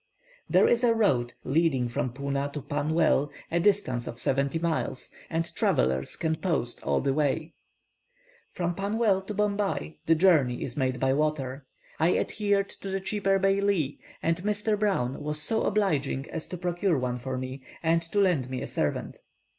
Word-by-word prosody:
There - - +5
is 240 +1 +3
a 230 -2 +4
road 125 - +1
leading 140 -4 +2
from 120 +1 -2
Puna 140 +2 -2
to 150 - -4
Pannwell, 145 0 +1 0.2
a 170 - +2
distance 170 -11 +1
of 115 - -6
seventy 140 +3 +1
miles, 165 -5 -2 0.2
and 165 +1 -2
travellers 65 +1 +1
can 160 -1 -1
post 155 -9 0
all - - +1
the 135 -1 +1
way. 155 +2 0 1.0
From 175 -1 -1
Pannwell 200 +1 +1
to 210 - -3
Bombay 200 - -1
the 165 - +5
journey 155 -8 +3
is 125 - -5
made 130 -3 0
by 130 +1 +2
water. 140 -2 -1 0.3
I 165 +3 +3
adhered 205 -2 0
to 195 - -5
the 195 0 -1
cheaper 195 0 +1
baili, 195 -6 +1 0.2
and 165 0 +2
Mr. 210 +3 0
Brown 165 -12 0
was 150 0 -2
so 220 +8 0
obliging 150 -10 0
as 165 - -4
to 180 +2 -6
procure 175 0 0
one 125 -1 -2
for 130 +1 -4
me, 130 +1 -5 0.2
and 165 +1 +3
to 170 +5 -2
lend 170 -10 +2
me 130 -1 -3
a - - -4
servant. - - -2
160 Hz, 170 wpm, -27 LUFS, 135-195 Hz, 1.0 s, There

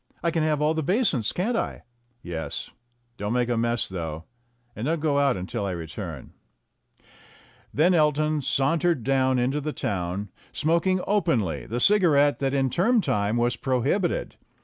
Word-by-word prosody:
I 170 - +2
can 165 - 0
have 155 -1 +1
all 155 +1 +3
the 160 - -1
basins, 170 - +1
can't 220 +7 -1
I?" - - -3 0.4
"Yes. 80 -4 -5 0.5
Don't 105 +2 -2
make 125 -1 +1
any 120 -2 +1
mess, 120 0 0
though; 80 -4 -5 0.5
and 115 +5 -3
don't 165 +1 0
go 145 -2 +1
out 140 -6 +2
until 95 +4 -4
I 95 -2 -2
return." 80 - -7 1.4
Then 170 +6 +3
Elton 155 -1 +2
sauntered 145 +2 +1
down 130 0 +2
into 130 +4 0
the 150 +1 -3
town, 95 +1 -3 0.2
smoking 170 +4 +1
openly 135 - 0
the 120 +3 -2
cigarette 145 -5 +4
that 135 -1 0
in 135 -2 +1
term 230 +7 +3
time 105 - 0
was 120 +1 +1
prohibited. 135 - -1
135 Hz, 155 wpm, -25 LUFS, 110-160 Hz, 1.4 s, cigarette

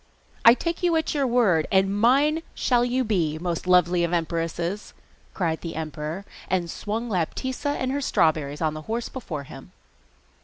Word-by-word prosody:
'I 230 +1 +9
take 335 +6 -3
you 350 -2 +2
at 320 -1 0
your 280 -3 +1
word, 220 -10 +3
and 195 0 +3
mine 280 +9 +3
shall 245 -2 +2
you 250 +1 +1
be, 170 -9 0
most 175 +1 -3
lovely 180 -1 +4
of 170 0 -1
empresses!' 170 +3 -2 0.4
cried 165 -4 -1
the 165 - -6
emperor, 155 +4 -5 0.2
and 175 -3 0
swung 225 +3 -4
Laptitza 260 - -2
and 260 0 -1
her 285 +1 -1
strawberries 155 - +1
on 155 -1 +1
the 155 - -6
horse 230 +1 -2
before 165 - -6
him. - - -12
190 Hz, 165 wpm, -25 LUFS, 165-245 Hz, 0.4 s, I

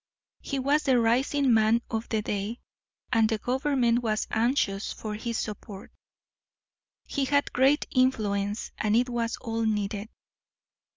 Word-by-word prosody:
He 275 - -3
was 280 +3 +2
the 260 -4 +3
rising 255 +3 +2
man 225 +1 +3
of 225 0 -3
the 220 -2 0
day, 205 +4 -3 0.5
and 225 -2 +4
the 220 - 0
government 250 0 +1
was 215 -2 -1
anxious 225 -4 0
for 215 -1 -6
his 225 +2 -3
support. 205 -2 -6 1.1
He 275 - -1
had 285 +1 +1
great 270 +4 +3
influence, 210 -5 0
and 215 0 +1
it 250 +2 +2
was 235 -1 -2
all 225 0 -3
needed. 210 -1 -1
230 Hz, 135 wpm, -27 LUFS, 215-255 Hz, 1.1 s, and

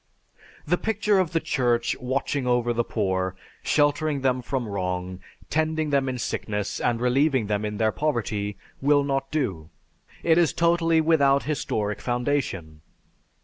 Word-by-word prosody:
The 175 +4 +1
picture 210 -2 +1
of 180 -4 0
the 165 - +1
Church 120 -5 0
watching 130 +1 -1
over 120 -1 +2
the 120 0 +1
poor, 95 -4 -1 0.3
sheltering 145 -1 +1
them 130 -1 +1
from 125 -1 -3
wrong, 90 -2 -3 0.3
tending 155 -1 0
them 135 -2 +2
in 130 - -3
sickness, 105 -4 -3
and 120 -1 +1
relieving 130 0 +2
them 105 0 -1
in 105 0 -3
their 110 0 +2
poverty 105 -8 -2 0.2
will 145 +1 +4
not 135 -1 -1
do. 95 - -2 0.5
It 165 0 +4
is 170 -3 +3
totally 170 -1 +3
without 140 -4 +3
historic 105 -8 -2
foundation. 120 - -2
130 Hz, 145 wpm, -25 LUFS, 105-150 Hz, 0.5 s, will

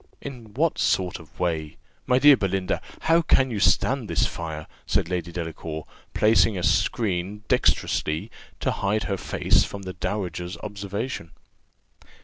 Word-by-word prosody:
"In 120 -6 -9
what 160 +4 +1
sort 90 -1 +1
of 80 -3 -17
way? 80 -4 -1 0.3
My 125 - +4
dear 145 +2 +8
Belinda, 95 -3 -1 0.2
how 165 +1 +4
can 135 -5 +3
you 105 - -2
stand 110 - +2
this - - +2
fire?" 80 -2 -5 0.2
said - - +1
Lady 90 -2 -2
Delacour, 80 -2 -5 0.3
placing 110 -1 +4
a 90 - -3
skreen, 105 -1 0
dexterously, 75 +1 +1 0.3
to - - +1
hide 105 +2 0
her 100 - -1
face - - +2
from 100 -1 -6
the 95 -1 -5
dowager's 90 -3 -3
observation. 105 -1 -4
100 Hz, 140 wpm, -25 LUFS, 85-110 Hz, 0.3 s, dear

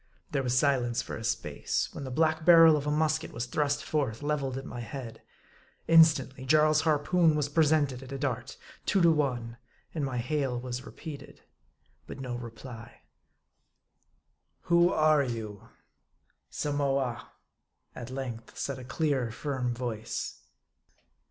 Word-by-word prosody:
There 140 -3 0
was 125 -1 0
silence 125 -3 +2
for - - -6
a 110 - -7
space, 110 - -2
when 140 - -6
the - - -5
black 160 +4 +1
barrel 165 -1 +8
of 145 -1 -2
a - - +1
musket 155 +1 0
was 115 - -4
thrust 145 +3 -1
forth, 145 -6 -1
leveled 140 -3 -1
at 135 - -6
my 120 - -7
head. 120 -1 -7 0.7
Instantly, 155 -5 +5
Jarl's 155 +3 +4
harpoon 160 +1 +3
was 150 -1 0
presented 145 -4 +2
at 135 0 -11
a 135 - -4
dart; 130 -2 -3 0.3
two 195 - +3
to 170 - +7
one; 125 -6 -1 0.4
and 155 - -2
my 130 -2 -2
hail 130 0 -1
was 125 +1 -6
repeated. 150 -3 -10 0.6
But - - -8
no 125 -2 -4
reply. 115 0 -9 0.8
" - - -47
Who 170 +1 +5
are 155 -1 +4
you 110 -6 -5 0.3
?" - - -48
" - - -45
Samoa," 140 -4 -1 0.6
at 120 0 -8
length 125 -4 -6
said 135 -1 -3
a - - -8
clear, 135 -2 -1
firm 130 +1 -3
voice. 115 -2 -4
135 Hz, 150 wpm, -29 LUFS, 125-150 Hz, 0.8 s, barrel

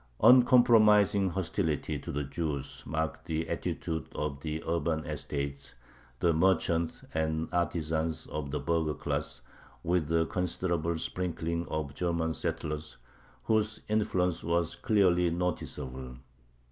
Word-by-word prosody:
Uncompromising 110 -6 +6
hostility 80 -4 -1
to - - -6
the 75 +1 -2
Jews 70 -1 -3
marked 80 +1 -2
the 80 -1 -2
attitude 80 -3 -3
of 75 -2 -3
the 80 +1 -4
urban 80 -1 0
estates, 70 -2 -4 0.4
the 85 -2 +3
merchants 85 -1 +1
and 80 0 0
artisans 80 -2 -1
of 75 -2 -5
the 75 - -2
burgher 80 -3 0
class, - - -3 0.4
with 85 -3 0
a 80 0 +3
considerable 85 -2 -1
sprinkling 85 0 -2
of 75 -2 -3
German 85 0 -1
settlers, 75 -1 -4 0.5
whose 110 0 +1
influence 90 -5 +1
was 85 0 0
clearly 90 -5 +3
noticeable. 65 -7 -4
80 Hz, 115 wpm, -30 LUFS, 80-90 Hz, 0.5 s, Uncompromising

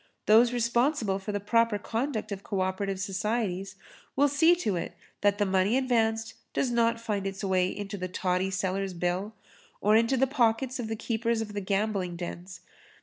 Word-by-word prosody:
Those 230 +3 +6
responsible 235 -3 +1
for 195 +2 -5
the 205 - -1
proper 230 +1 +2
conduct 220 +1 -3
of 195 -1 -4
co 195 -1 -2
operative 190 +1 -2
societies 195 -1 -2 0.4
will 285 +1 +4
see 320 +5 +4
to 220 - -1
it 170 - -4 0.3
that 205 0 +3
the 205 - +2
money 190 +5 +2
advanced 225 -3 +1 0.2
does 255 - 0
not 230 -1 +2
find 210 -4 -2
its 195 +1 -6
way 185 -2 +2
into 200 +1 -5
the 185 - -3
toddy 185 +1 -1
seller's 190 0 -2
bill 180 +5 -2 0.4
or 210 +2 +3
into 230 +4 +3
the 265 - +4
pockets 255 -1 +1
of 235 - -3
the 225 - -3
keepers 230 +1 -1
of 215 -2 -4
gambling 195 -3 -1
dens. 175 +1 -7
210 Hz, 175 wpm, -28 LUFS, 190-230 Hz, 0.4 s, Those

